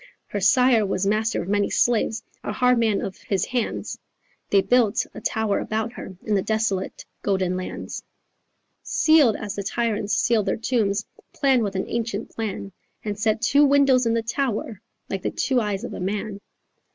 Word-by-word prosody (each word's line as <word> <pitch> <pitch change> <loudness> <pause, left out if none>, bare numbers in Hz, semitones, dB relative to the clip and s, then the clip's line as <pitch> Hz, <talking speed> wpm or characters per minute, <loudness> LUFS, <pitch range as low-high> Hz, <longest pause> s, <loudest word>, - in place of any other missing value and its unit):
Her 205 - -2
sire 235 +3 +4
was 195 -1 -1
master 215 +3 +1
of - - -9
many 205 0 +1
slaves 235 -1 +1 0.2
A - - -3
hard 250 -1 +3
man 220 -3 +2
of 190 - -5
his 195 -3 -1
hands; 245 -3 -3 0.5
They 200 - +5
built 245 -5 +3
a - - -9
tower 220 -2 0
about 220 +2 -2
her 190 -6 -9
In 215 - -1
the 195 - +3
desolate 215 -3 -1 0.2
golden 190 -2 0
lands, 185 0 -5 0.8
Sealed 305 -8 +4
as 205 -2 -5
the 205 - -4
tyrants 210 -1 -1
sealed 220 -4 +2
their - - +1
tombs, 220 -3 0 0.3
Planned 265 -3 +3
with 200 -3 -2
an 190 - -1
ancient 230 0 -3
plan, 205 -3 -4 0.3
And 205 -1 -3
set 220 +1 +1
two 280 +5 +5
windows 275 -3 +4
in 230 - +2
the 230 - 0
tower 230 -4 -2 0.3
Like 195 - -3
the - - -1
two 260 -3 +1
eyes 205 -2 -2
of - - -5
a - - -6
man." 200 +2 -3
220 Hz, 175 wpm, -24 LUFS, 200-235 Hz, 0.8 s, They